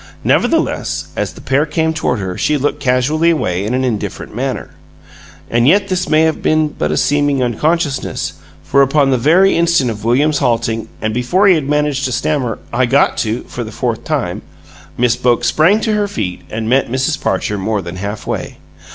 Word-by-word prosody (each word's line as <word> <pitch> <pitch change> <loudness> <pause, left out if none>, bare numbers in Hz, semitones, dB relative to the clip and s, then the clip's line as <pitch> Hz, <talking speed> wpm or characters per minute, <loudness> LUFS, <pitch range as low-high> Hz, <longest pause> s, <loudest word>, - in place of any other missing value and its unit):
Nevertheless, - - 0
as - - -2
the - - -13
pair 135 +3 +1
came 160 +1 0
toward 140 -6 -1
her 95 -3 -4
she 150 +9 +1
looked 145 +1 -1
casually 145 +5 +2
away 95 - 0
in 110 +5 -1
an 130 - 0
indifferent 115 -5 -4
manner. - - -3 0.8
And 120 +1 +2
yet 200 +5 +3
this 185 -1 -1
may 155 0 +4
have 160 -1 0
been 155 -1 +2
but 75 - -3
a 75 - 0
seeming 145 - +1
unconsciousness, 145 +5 -1 0.3
for 140 - +3
upon 140 0 +3
the 130 - +2
very 175 +9 +4
instant 170 -7 +2
of 105 -1 -8
William's 145 +6 +2
halting, 115 -1 0 0.2
and 110 0 -1
before 125 - +2
he 190 - +7
had 150 -5 -1
managed 150 -2 0
to 130 - -1
stammer 125 -2 -1 0.2
"I 130 - +2
got 135 +4 +3
to 110 +1 -1
" - - -21
for - - -5
the - - -8
fourth - - -3
time, - - -2 0.6
Miss 120 -1 +2
Boke 120 -1 +1
sprang 180 +8 +3
to 220 - 0
her 210 -1 +1
feet 100 - -4
and 110 0 -4
met 130 +2 +2
Mrs. 130 +5 -1
Parcher 100 +2 -1
more 105 0 -1
than 85 +1 -7
halfway. 100 +3 -5
135 Hz, 195 wpm, -16 LUFS, 115-155 Hz, 0.8 s, he